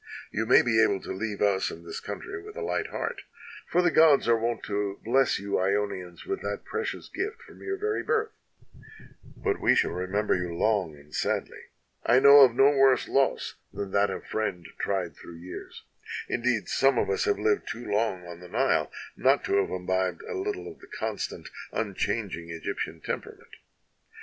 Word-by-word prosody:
You 110 +1 -1
may - - +7
be 110 -2 +3
able 100 -3 +3
to - - -7
leave 105 +1 -3
us 100 -2 +2
and 85 +1 -10
this - - -5
country 390 +2 -6
with 425 +1 -11
a 475 - -4
light - - -1
heart, - - -4 0.5
for 180 +1 +2
the 175 - +3
gods 155 -6 +5
are 115 - +5
wont 115 +1 -2
to 100 -1 -2
bless 130 +3 +3
you 100 +1 -7
lonians 95 -2 -1
with 395 - -3
that - - -4
precious 450 +1 -4
gift 420 +4 -4
from - - -15
your 390 0 -3
very 425 +1 -1
birth, 445 -1 0 1.1
but 405 -2 -1
we - - +4
shall - - +2
remember 95 +4 0
you 90 -2 -2
long 95 -5 +1
and 75 +1 -18
sadly. - - -2 0.4
I 120 - +4
know 140 +2 +9
of 130 -4 +7
no 135 +3 +6
worse 135 -1 +4
loss 135 0 +1
than 100 -1 -5
that 100 +1 +3
of - - -5
a - - -17
friend 90 -6 -2
tried 95 -4 -1
through 85 - -11
years; 90 +2 -9 0.4
indeed, 120 -3 0
some 135 0 +3
of - - +2
us 435 0 0
have 415 -2 +2
lived 425 -1 +1
too 120 +2 -5
long 105 -3 0
on 85 -1 -9
the 90 - -11
Nile - - +1 0.2
not 135 +3 +3
to 100 - +2
have 100 - +2
imbibed 95 -1 -1
a - - -6
little 400 +1 -3
of - - -10
the - - -15
constant, - - -4 0.2
unchanging 100 -4 -2
Egyptian 85 -1 -4
temperament. - - -6
110 Hz, 190 wpm, -27 LUFS, 95-140 Hz, 1.1 s, know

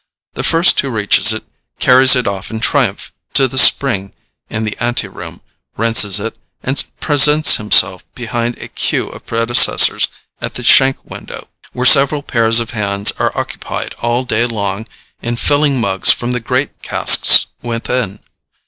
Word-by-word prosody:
The - - -6
first 165 +2 +2
who 140 - -2
reaches 110 -1 +2
it 110 - -6 0.3
carries 130 +1 +4
it 125 - -2
off 100 -1 -5
in 110 0 -7
triumph - - -2 0.2
to 135 - +3
the 130 +1 -1
spring 100 -10 +3 0.4
in 110 - -5
the 105 -1 -5
anteroom, 120 +1 -6 0.4
rinses 110 -3 +3
it, - - -7 0.3
and 135 +2 0 0.2
presents 150 +1 +4
himself 105 -3 +2
behind 120 0 -5
a - - -10
queue - - -4
of - - -15
predecessors 115 +1 +3 0.3
at - - -6
the - - -7
shank 135 0 +3
window, - - -11 0.2
where 125 - -4
several 140 +2 +4
pairs 115 -2 +1
of 115 0 -5
hands 100 -3 0
are - - -3
occupied - - -6
all 120 +2 -2
day 120 -1 -2
long 100 -2 -5 0.3
in 120 0 -4
filling 145 +1 0
mugs 95 -4 +1
from 120 +1 -3
the 125 - -2
great 125 +4 -4
casks - - +4 0.2
within. 115 -3 -5
120 Hz, 155 wpm, -13 LUFS, 110-130 Hz, 0.4 s, carries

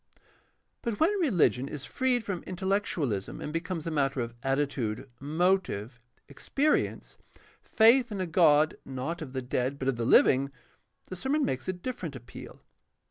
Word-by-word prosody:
But 230 -3 -3
when 325 +5 +4
religion 175 - +2
is 145 -2 -6
freed 255 -2 0
from 195 -4 -4
intellectuahsm 185 - -2
and 150 - -5
becomes 165 -1 -3
a 165 - -2
matter 140 -3 0
of 115 0 -4
attitude, 135 -5 -1
motive, 150 - 0 0.3
experience, 280 - -1 0.4
faith 235 +2 +4
in 200 - -4
a 185 - 0
God 155 -3 +4
not 135 +6 -5
of 135 -4 -7
the 130 -1 -3
dead 125 +2 -1
but 135 - -4
of 135 -3 +1
the 115 - -1
living, 135 +3 +5 0.6
the 185 - -5
sermon 275 +9 0
makes 130 +5 -3
a 185 - 0
different 180 - -6
appeal. 120 -1 -11
155 Hz, 150 wpm, -29 LUFS, 130-195 Hz, 0.6 s, living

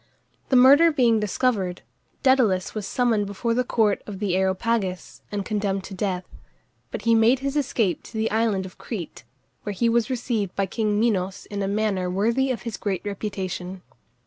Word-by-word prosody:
The 265 - +3
murder 280 +6 +7
being 240 -6 +3
discovered, 205 -3 -1 0.4
Dædalus 240 -9 +3
was 210 -3 -4
summoned 230 -5 +1
before 215 +4 -2
the 250 +2 +1
court 220 -4 +1
of 205 -2 -6
the 195 -2 -1
Areopagus 190 0 -1
and 205 -2 -3
condemned 200 -3 -1
to 195 - -9
death; 185 -2 -2 0.6
but - - -6
he 230 - +3
made 225 +3 +5
his 275 +1 -2
escape 230 - 0
to - - -13
the 220 +1 0
island 215 -3 +1
of 185 - -12
Crete, 180 - -7 0.4
where 205 - -4
he 230 +4 +1
was 235 +1 +2
received 230 -6 -2
by 195 - +1
king 210 +1 -1
Minos 195 -4 0
in 205 -1 -3
a 195 - -1
manner 200 -3 0
worthy 230 +8 +1
of 255 - -3
his 230 -4 -5
great 195 -2 -3
reputation. 190 -3 -4
210 Hz, 175 wpm, -24 LUFS, 190-235 Hz, 0.6 s, murder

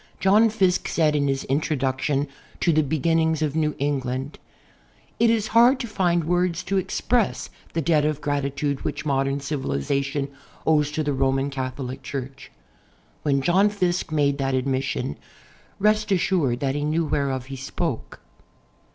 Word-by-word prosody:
John 210 +4 +5
Fiske 190 -4 +1
said 155 -2 +2
in 140 -1 +1
his 135 -1 0
introduction 140 0 0 0.3
to 170 - +2
"The 155 - +4
Beginnings 160 +2 +1
of 150 -1 -1
New 155 -1 +1
England'': 135 -1 -2 0.8
"It 235 - +5
is 220 -2 +1
hard 240 +4 +5
to - - -3
find 175 -5 +1
words 175 +1 0
to 195 - -1
express 230 +4 0 0.2
the 165 - -1
debt 155 -1 +3
of 150 -1 0
gratitude 140 -1 -2
which 145 +1 -3
modern 135 -1 0
civilization 140 - -2 0.4
owes 150 -2 +3
to 155 - -1
the 145 -1 0
Roman 135 +1 +1
Catholic 130 0 -4
Cliurch." 135 0 -6 0.7
When 140 -2 +1
John 190 +7 +4
Fiske 180 -5 -1
made 145 -2 +1
that 135 -1 0
admission, 130 - -1 0.6
rest 215 +1 +2
assured 170 -9 +1
that 135 -1 0
he 145 +1 -2
knew 160 +2 +1
whereof 135 -4 -1
he 135 0 -7
spoke. 135 0 -4
145 Hz, 150 wpm, -24 LUFS, 135-170 Hz, 0.8 s, John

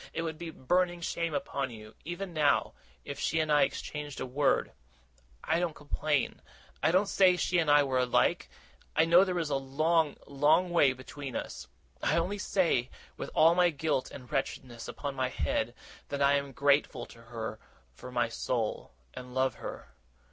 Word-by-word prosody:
It 165 - -2
would 160 -1 -4
be 170 - -5
a - - -6
burning 175 +6 +1
shame 170 -2 -2
upon 140 -1 -2
you, 110 -2 -11
even 175 +3 -5
now, 150 -3 +2 0.3
if 140 -1 -6
she 160 - 0
and 155 -1 0
I 145 -1 +5
exchanged 145 -2 -2
a - - -2
word. 135 +3 +1 0.7
I 165 - +1
don't 175 -3 -1
complain. 145 -1 -1 0.4
I 155 - +3
don't 185 +5 +4
say 185 -2 +4
she 180 0 +1
and 160 -3 +1
I 145 0 +6
are 130 -2 0
alike 125 -1 +2 0.5
I 160 - +5
know 170 +3 +7
there 185 -2 -1
is 160 -3 -1
a 140 - +2
long, 155 +3 +1
long 155 +6 +3
way 145 -6 +5
between 130 +1 -8
us. - - -5 0.3
I - - +2
only 185 +5 -1
say, 165 -12 +1 0.3
with - - -6
all 165 +2 +6
my 175 0 +4
guilt 150 -3 -1
and 125 -3 -11
wretchedness 125 -3 -3
upon 140 -1 -5
my 130 -1 -1
head, 120 -1 -1 0.3
that 140 - -3
I 140 0 +4
am 140 -1 0
grateful 140 +3 +2
to 115 - -15
her 115 -2 -6 0.3
from 125 - -11
my 120 -1 +2
soul, 115 - -3 0.2
and 125 0 -9
love 130 0 +2
her. - - -8
145 Hz, 185 wpm, -30 LUFS, 130-165 Hz, 0.7 s, know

